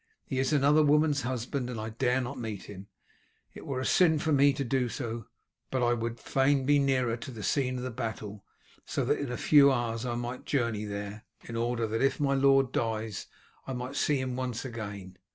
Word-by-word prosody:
He 130 - -2
is 135 +1 +1
another 145 +1 +4
woman's 150 0 +3
husband 125 +1 -3
and 120 -3 -4
I 110 +1 -4
dare 125 +3 +1
not 130 +2 -5
meet 110 -4 -5
him, 100 -1 -10 0.7
it - - -11
were 130 -2 -2
sin 160 +2 +4
for 155 +1 -1
me 140 0 +5
to 140 0 -3
do 125 -1 0
so; 115 -3 -5 0.4
but 130 -2 0
I 120 0 +3
would 115 0 -3
fain 135 0 +2
be 145 +1 +4
nearer 130 -4 +1
to 120 - -8
the 115 -5 -8
scene 130 -3 0
of 125 -2 -5
battle, 110 -4 -5 0.4
so - - -2
that - - +1
in 140 -3 -3
a 125 - -3
few 140 -2 +6
hours 115 -2 -1
I 120 -2 -2
might 120 +1 -5
journey 115 -6 0
there, 105 +1 -6 0.2
in 115 - -7
order 120 0 0
that, 110 +1 -2
if 135 - +2
my 140 -1 +2
lord 135 -1 +4
dies, 110 -3 -2 0.4
I 135 - -3
might 125 +2 -5
see 145 -1 +2
him 130 -1 -2
once 125 -1 -3
again. 100 -6 -7
125 Hz, 205 wpm, -29 LUFS, 115-135 Hz, 0.7 s, few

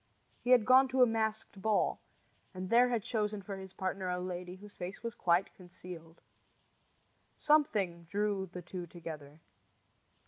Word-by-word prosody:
He 245 - -5
had 250 -4 +6
gone 260 +2 +7
to 260 0 +4
a - - +8
masked 220 -3 -2
ball, 215 0 +1 0.6
and 185 0 -5
there 245 +2 +6
had 235 -4 0
chosen 210 -3 -2
for 195 0 -6
his 190 -1 -9
partner 190 0 -3
a 180 0 -1
lady 180 0 -5
whose 205 +2 -13
face 180 +5 -7
was 230 -1 -3
quite 175 0 +1
concealed. 175 -2 -11 1.2
Something 205 - +2
drew 200 +1 -1
the 180 -1 -7
two 175 0 -6
together. 160 -3 -9
190 Hz, 150 wpm, -33 LUFS, 180-220 Hz, 1.2 s, a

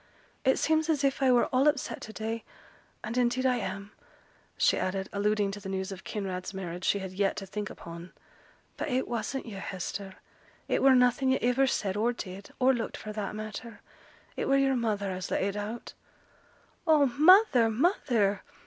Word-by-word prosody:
'It 265 - +4
seems 315 0 +1
as 295 -3 +1
if 275 0 +1
I 265 -1 +5
were 245 -1 +4
all 260 +3 +4
upset 290 -2 0
to 220 - -8
day; 220 +1 -4 0.6
and 225 +2 -4
indeed 250 +1 +1
I 250 -1 +3
am;' 200 -1 -5 0.7
she - - +4
added, 190 +1 -2
alluding 205 0 +1
to 205 - -7
the 195 -1 -7
news 190 0 -3
of 190 -1 -8
Kinraid's 190 -2 -4
marriage 180 -1 -5
she - - +3
had 190 -2 -5
yet 195 +1 0
to 195 - -5
think 210 +2 -5
upon. 170 +1 -10 0.7
'But - - -3
it 260 0 0
wasn't 240 +3 -3
yo', 205 -5 -7
Hester: 190 +1 -5 0.5
it - - +1
were 270 -1 +6
nothing 250 +1 +3
yo' 260 - +3
iver 265 +2 +3
said, 195 -6 -1
or 230 +4 +1
did, 195 -3 -8
or 260 +1 +4
looked, 235 -2 -3
for 215 - -7
that 210 -1 -4
matter. 215 +1 -7 0.5
It - - -2
were 275 - +4
yo'r 270 -1 +3
mother 210 -5 -1
as 185 0 -5
let - - 0
it 200 +1 -1
out.' 210 +3 -5 0.9
'Oh, 305 -3 +6
mother! 295 - +6
mother!' 220 - +1
215 Hz, 185 wpm, -29 LUFS, 195-260 Hz, 0.9 s, were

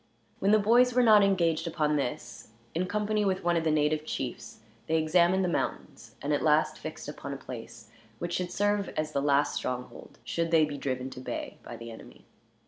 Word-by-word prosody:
When 195 - +1
the 215 - +6
boys 240 +4 +4
were 250 - +5
not 215 -3 +7
engaged 170 -4 +2
upon 155 -2 0
this, 135 -4 -4 0.3
in 180 +3 -1
company 210 +2 0
with 190 -1 0
one 175 0 +2
of 165 - +1
the 160 - +1
native 150 0 +1
chiefs 120 -5 -5 0.3
they 160 - +2
examined 170 +4 +3
the - - +1
mountains, 175 - -4
and 145 +1 0
at 145 - +1
last 155 0 +2
fixed 155 -2 -7
upon 140 -1 -6
a - - -5
place 115 -3 -10 0.3
which 175 +5 -4
should 180 -1 -2
serve 205 0 +1
as 155 0 -1
the 140 - 0
last 140 0 +2
stronghold, 125 0 -5
should 165 0 -2
they 160 -2 +5
be 145 -2 -6
driven 130 -1 -3
to 130 - -8
bay 130 - -5
by - - -9
the 115 0 -8
enemy. - - -13
155 Hz, 205 wpm, -29 LUFS, 140-190 Hz, 0.3 s, not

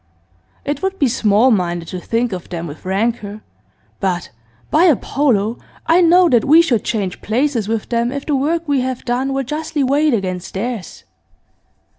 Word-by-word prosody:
It 285 0 -2
would 385 0 -2
be 280 - +2
small 225 +1 +3
minded 175 -5 -1
to 185 - -5
think 230 +4 -1
of 180 -2 -7
them 170 -1 -5
with 150 +1 -10
rancour, 210 +1 -2 0.6
but, 180 -3 -2 0.4
by 320 +4 +4
Apollo! 245 - +1 0.3
I 335 +3 +4
know 355 +1 +5
that 240 -7 +3
we 320 +4 +6
should 245 -10 0
change 200 -5 -3
places 240 -1 0
with 225 -1 -2
them 235 0 0
if 280 0 -5
the 295 - 0
work 320 +5 -1
we 280 -3 +1
have 255 -1 -4
done 255 +3 -1
were 270 0 -1
justly 300 +2 -2
weighed 285 +1 +2
against 185 -3 -4
theirs. 220 -2 -5
240 Hz, 170 wpm, -18 LUFS, 200-290 Hz, 0.6 s, we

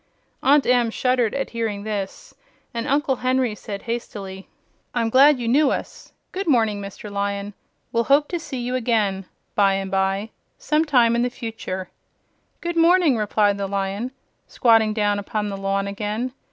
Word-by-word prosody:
Aunt 280 +2 +4
Em 245 -2 +3
shuddered 250 -1 +1
at 275 - -2
hearing 220 -3 -3
this, 210 - -5 0.4
and 230 -1 -3
Uncle 280 -1 +1
Henry 255 -2 +1
said 205 -1 -7
hastily: 195 -5 -6 0.5
"I'm 230 -2 0
glad 275 +3 +7
you 240 -2 -4
knew 280 +5 +4
us. - - -5 0.2
Good 385 0 -4
morning, 220 -7 +2
Mr. 200 +1 -8
Lion; 200 0 -2 0.4
we'll 230 0 +1
hope 290 +2 +4
to 345 - -2
see 305 -5 -6
you 245 +1 -3
again 215 -6 0 0.3
by 200 -1 +3
and 195 -1 -3
by 195 +2 0 0.3
some 310 +1 +1
time 240 -6 +4
in 235 - +1
the 245 - +1
future." 225 -7 -6 0.7
"Good 345 0 -3
morning," 335 -4 +5
replied 210 -2 +1
the 200 - -1
Lion, 200 +4 -2 0.4
squatting 225 -3 +3
down 205 -2 +1
upon 210 +1 -3
the 195 - -4
lawn 195 0 -1
again. 210 +5 -3
225 Hz, 165 wpm, -22 LUFS, 200-255 Hz, 0.7 s, glad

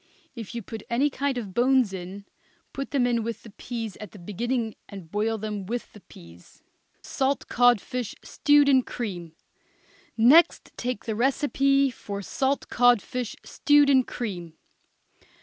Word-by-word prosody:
If 230 -2 -8
you 235 - -4
put 220 +2 -8
any 270 +5 +1
kind 275 -1 -2
of 205 -6 -5
bones 250 -3 +3
in, 190 +2 -7 0.5
put 275 0 -5
them 270 -4 +1
in 240 -1 +1
with 230 0 -5
the 220 - -12
peas 225 -1 -6
at 210 -3 -10
the - - -11
beginning 225 +5 -3 0.2
and 185 -5 -10
boil 220 +2 0
them 210 -2 -5
with 240 +2 -5
the 210 - -13
peas. 85 - -17 0.4
SALT 270 0 -1
CODFISH, 245 -1 +1
STEWED 290 -1 +3
IN 265 -2 +5
CREAM. 180 -10 -6 0.8
Next 270 +10 +5
take 250 -3 -4
the 220 - -2
recipe 275 +2 +2
for 200 -4 -7
salt 270 +7 -1
codfish, 245 0 +1
stewed 290 -1 +3
in 265 -1 +6
cream. 180 -10 -6
235 Hz, 150 wpm, -26 LUFS, 205-265 Hz, 0.8 s, in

